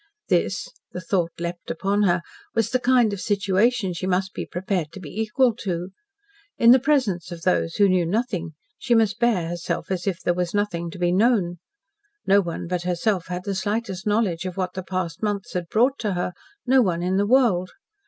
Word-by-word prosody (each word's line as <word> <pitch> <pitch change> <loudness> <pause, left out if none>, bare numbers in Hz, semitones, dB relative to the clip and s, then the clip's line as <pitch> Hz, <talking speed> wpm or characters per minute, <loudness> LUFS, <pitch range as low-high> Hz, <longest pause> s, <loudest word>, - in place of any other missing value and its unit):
This - - +1 0.3
the - - -4
thought 175 -1 0
leaped 170 +1 -5
upon 200 +5 0
her 175 0 +1 0.3
was 225 -2 +1
the 255 - +2
kind 245 -4 +3
of 200 - -5
situation 200 +1 +1
she 180 +2 -4
must 190 +1 0
be - - -5
prepared 180 -3 -2
to - - -8
be 165 -6 -9
equal 235 +3 +2
to. 180 -4 -3 0.7
In 235 0 +7
the 260 - +7
presence 250 - +1
of 170 -1 -8
these 85 -1 +1
who 200 - +5
knew 180 -3 +2
nothing, 185 -5 -2 0.3
she 240 -3 +2
must 220 -4 +2
bear 220 -9 +2
herself 175 +2 -4
as 185 0 -2
if 185 -2 -1
there 175 - +1
was 180 +1 -2
nothing 175 -5 -1
to 170 - -9
be 175 -1 +1
known. 190 -4 +2 0.7
No 200 +1 +5
one 170 -3 -5
but 180 0 -2
herself 180 +1 -1
had 180 0 -4
the 200 - -2
slightest 205 0 -2
knowledge 205 -6 +1
of 185 0 -5
what 185 -1 -2
the 185 - -4
past 185 -2 -4
months 205 -2 -2
had 175 -2 -3
brought 255 +5 +2
to 210 -4 -1
her 180 0 -2 0.3
no 260 +1 +5
one 175 -6 0
in 185 +1 +1
the 205 +1 +2
world. 215 -8 +3
190 Hz, 200 wpm, -24 LUFS, 175-215 Hz, 0.7 s, In